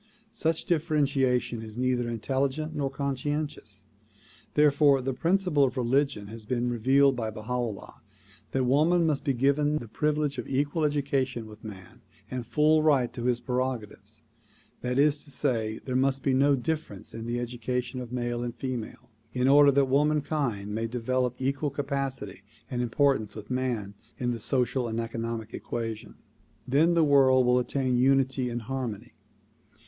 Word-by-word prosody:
Such 160 0 0
differentiation 140 -7 +1
is 110 0 -9
neither 125 -1 0
intelligent 135 +7 -1
nor 140 -2 -1
conscientious; 145 +2 -4 0.7
therefore 145 -1 +5
the 130 +1 -2
principle 170 0 +2
of 135 0 0
religion 130 -3 +1
has 110 +2 -9
been 120 0 0
revealed 135 +4 +4
by 115 -2 -2
Baha 110 +3 -6
'Ullah 120 -5 -4 0.5
that 130 - +1
woman 155 +7 +3
must 150 -3 0
be 140 -3 0
given 145 +4 +2
the 120 - -6
privilege 150 +3 -1
of 120 - -5
equal 145 +4 0
education 135 -4 -1
with 105 0 -13
man 95 -4 -10 0.3
and 125 -2 -4
full 155 +4 +3
right 140 -6 +3
to 120 -2 -5
his 125 -1 +2
prerogatives. 125 -4 -3 0.6
That 125 +1 -2
is 145 +1 +3
to - - -13
say, 115 -6 -1
there 130 - -3
must 135 +1 +1
be 135 - +2
no 140 +2 +4
difference 135 - -4
in 115 0 -6
the 120 +1 -1
education 125 +1 -3
of 125 -1 -8
male 120 -1 -2
and 120 -1 -4
female, 125 -1 -6 0.2
in 125 0 +1
order 145 +1 +7
that 140 0 +4
womankind 140 -6 0
may 115 +1 -1
develop 125 +1 -1
equal 140 +3 -1
capacity 135 -8 -4 0.3
and 125 -1 -1
importance 120 -3 +1
with 110 +3 -9
man 120 -6 -2 0.2
in 120 -1 -1
the 120 - -3
social 125 +1 0
and 115 0 -3
economic 115 -1 -4
equation. 115 -2 -5 0.5
Then 155 +7 +3
the 165 - +4
world 135 -3 +5
will 125 0 +4
attain 125 0 0
unity 130 -1 +2
and 120 -1 -4
harmony. 125 -4 -5
130 Hz, 155 wpm, -27 LUFS, 120-140 Hz, 0.7 s, order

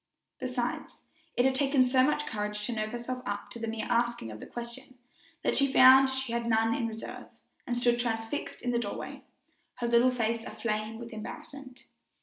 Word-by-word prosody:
Besides, 250 -1 -3 0.4
it 245 - +4
had 265 - +4
taken 270 -1 +3
so 255 +1 +4
much 295 +2 +2
courage 210 -1 -3
to 240 - -2
nerve 215 -1 -2
herself 245 +1 -4
up 205 0 -4
to 235 - -5
the 230 - -3
mere 225 0 -3
asking 235 - 0
of 110 - -8
the - - -9
question, 245 +2 -8 0.5
that - - +1
she 275 -1 +2
found 265 0 +8
she 265 -2 -2
had 235 0 -1
none 225 0 +3
in 230 - -1
reserve, 225 0 -7 0.4
and 240 -1 -1
stood 240 0 +2
transfixed 225 +2 -3
in 245 - 0
the 235 - +1
doorway, 205 -4 -5 0.5
her 240 -1 -2
little 235 +2 +5
face 230 -2 -1
aflame 215 -1 -3
with 235 0 -8
embarrassment. 255 +4 -9
240 Hz, 185 wpm, -30 LUFS, 225-255 Hz, 0.5 s, found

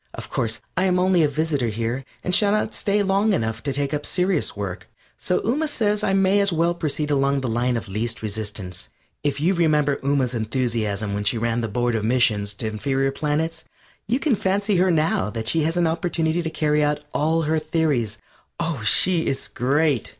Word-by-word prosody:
Of - - -8
course 110 -1 -1
I 185 - +1
am 180 -1 +2
only 180 -1 +3
a 155 - +4
visitor 145 -3 -1
here, 115 +4 -2 0.2
and 180 - -2
shall 200 +2 +4
not 215 +1 0
stay 205 0 0
long 200 +2 +2
enough 110 - -1
to 140 - -2
take 140 +1 -1
up 150 0 -2
serious 180 - 0
work, 100 -3 -5 0.3
so 180 - 0
Ooma 290 +8 0
says 210 -6 0
I 195 - +1
may 195 +1 +3
as 200 -1 +2
well 170 +1 +2
proceed 150 -3 -2
along 140 0 +2
the 130 - -2
line 120 +1 0
of 115 - -6
least 110 +4 -3
resistance. 100 - -4 0.3
If 145 -1 -1
you 170 +6 +2
remember 150 -5 +2
Ooma's 135 -3 0
enthusiasm 110 -3 -1
when 105 0 -2
she 105 +3 +2
ran 115 +1 0
the 115 - -2
Board 120 +3 0
of 110 -2 -1
Missions 110 -4 +1
to 110 - -3
Inferior 135 +5 -1
Planets, 155 +3 -2 0.4
you 240 +5 +1
can 285 -5 +2
fancy 200 0 0
her 185 +1 +3
now 165 - +1
that 110 0 -5
she 160 +6 +3
has 165 +2 -1
an 175 - +3
opportunity 165 0 0
to 165 - -3
carry 150 -1 +1
out 150 0 0
all 160 +2 +1
her 160 +1 +1
theories. 145 -10 0 0.4
Oh, 165 -7 -2
she's 160 +3 +3
great! 140 0 +1
150 Hz, 200 wpm, -23 LUFS, 115-175 Hz, 0.4 s, a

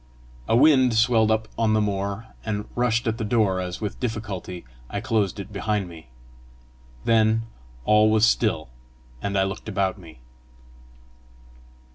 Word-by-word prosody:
A 115 - +3
wind 130 -3 +5
swelled 115 -1 +4
up 110 0 +1
on 110 -1 +2
the 110 - +3
moor, 100 +1 -2 0.2
and 105 -1 -3
rushed 120 -1 +1
at 110 0 -1
the - - -1
door 105 -4 +1
as 90 -1 -4
with 105 -3 -5
difficulty 105 - -5 0.2
I - - -3
closed 105 -4 0
it 100 +1 -8
behind 105 -1 -1
me. 80 -6 -13 1.0
Then 110 0 +3 0.4
all 105 0 +5
was 110 0 +4
still, 110 - +1 0.5
and 100 -1 -1
I 95 - +4
looked 95 +3 -4
about 100 -1 -1
me. 80 -8 -14
110 Hz, 145 wpm, -24 LUFS, 100-110 Hz, 1.0 s, wind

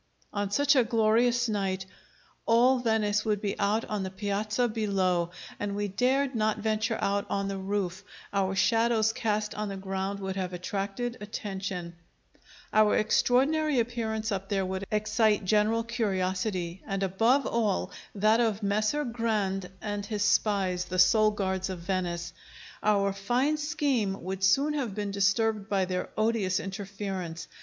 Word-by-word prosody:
On 205 -1 -1
such 285 +7 +3
a 255 - +5
glorious 235 +2 +2
night 195 -3 -1 0.6
all 245 +3 +5
Venice 215 -3 +1
would 210 -2 0
be 200 -1 -2
out 210 +2 +1
on 210 -2 -3
the 190 - -3
Piazza 210 +4 -1
below, 195 -6 0 0.3
and 205 -1 -2
we 205 0 -2
dared 260 +6 +1
not 215 -2 +1
venture 220 +1 0
out 200 0 0
on 200 0 -1
the 195 -1 -3
roof; 190 -1 -2 0.3
our 195 -1 +1
shadows 225 +1 +3
cast 215 -2 -1
on 210 -1 -3
the 195 - -5
ground 195 +1 -3
would 190 -1 -4
have 185 -1 -3
attracted 200 +6 -3
attention; 190 -4 -5 0.8
our 215 -1 +5
extraordinary 270 +6 +2
appearance 225 -2 -2
up 195 0 -3
there 195 -2 0
would 190 +1 -4
excite 215 -1 +2
general 215 +3 +2
curiosity, 190 -5 -2
and 195 0 -1
above 225 +9 +2
all, 220 -4 0 0.2
that 215 +3 +3
of 220 -3 +1
Messer 215 +8 +1
Grande 210 -6 -1
and 205 -1 -3
his 210 -1 -1
spies, 195 -4 +1
the 185 - -4
sole 215 +4 +5
guards 190 -2 -2
of 185 - -4
Venice. 175 -1 -3 0.5
Our 200 -2 +2
fine 245 +10 +1
scheme 285 - -1
would 190 +1 -4
soon 275 +11 +4
have 250 -9 -2
been 205 -1 -3
disturbed 200 +1 +1
by 195 -2 +2
their 180 0 -3
odious 215 -4 +1
interference. 195 -4 -5
205 Hz, 150 wpm, -28 LUFS, 195-225 Hz, 0.8 s, a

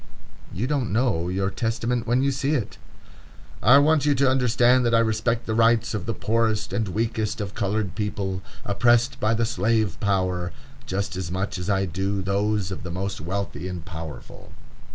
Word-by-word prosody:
You 105 +8 -2
don't 135 -5 -1
know 105 -7 +1
your 95 +2 -1
testament 115 +2 -1
when 125 +3 +2
you 140 - +2
see 140 +3 0
it. 115 -8 -3 0.8
"I 125 - +7
want 150 +1 +4
you 145 -1 +3
to 135 +1 +3
understand 125 -1 +3
that 115 -1 +2
I - - +5
respect 115 +1 0
the 110 - -2
rights 115 0 +3
of 105 -4 -4
the 115 - 0
poorest 110 -3 0
and 105 +1 0
weakest 110 +3 -1
of 100 -1 -4
colored 105 -2 -1
people, 100 -3 -3 0.2
oppressed 120 +6 +2
by 110 +1 +2
the 115 +1 +1
slave 110 -2 0
power, 90 -3 0 0.3
just 100 +1 -2
as 90 -3 -4
much 95 +1 -3
as 90 +2 -4
I 95 -1 +2
do 95 +2 -2
those 100 0 0
of 95 - -5
the 90 - -6
most 95 +2 -4
wealthy 90 -1 -4
and 90 -3 -6
powerful." 80 -4 -9
105 Hz, 180 wpm, -24 LUFS, 95-120 Hz, 0.8 s, I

